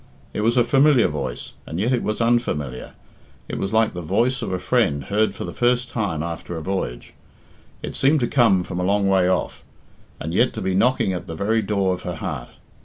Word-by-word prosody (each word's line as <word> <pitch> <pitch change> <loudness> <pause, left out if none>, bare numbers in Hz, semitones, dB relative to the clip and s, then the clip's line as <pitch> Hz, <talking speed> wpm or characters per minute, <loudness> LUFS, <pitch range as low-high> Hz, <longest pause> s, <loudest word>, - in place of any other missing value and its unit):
It - - -2
was 115 +3 +2
a 120 - +6
familiar 135 0 +4
voice, 70 -5 -5
and 80 - -4
yet 115 +6 +1
it 125 - +1
was 110 +2 -2
unfamiliar; 75 - -1 0.5
it - - -4
was 95 - -2
like 110 0 +2
the 90 - -5
voice 115 +10 +1
of - - -3
a 95 - 0
friend 90 - +1
heard 105 +2 0
for - - -5
the 85 - -6
first 125 0 +1
time 100 -10 -2
after 85 0 -5
a - - -4
voyage. 75 -11 -4 0.7
It - - -5
seemed 145 +3 +3
to 120 - +1
come 110 -9 +3
from 90 0 -5
a - - -1
long 100 +1 +2
way 95 -2 +3
off, 95 - -1 0.6
and 80 +2 -4
yet 120 +7 +3
to - - -5
be 95 0 -1
knocking 100 -1 +2
at 90 - -5
the 80 - -5
very 110 +6 +1
door 100 -2 0
of 90 - -6
her 90 -1 -4
heart. - - -5
100 Hz, 220 wpm, -22 LUFS, 90-120 Hz, 0.7 s, a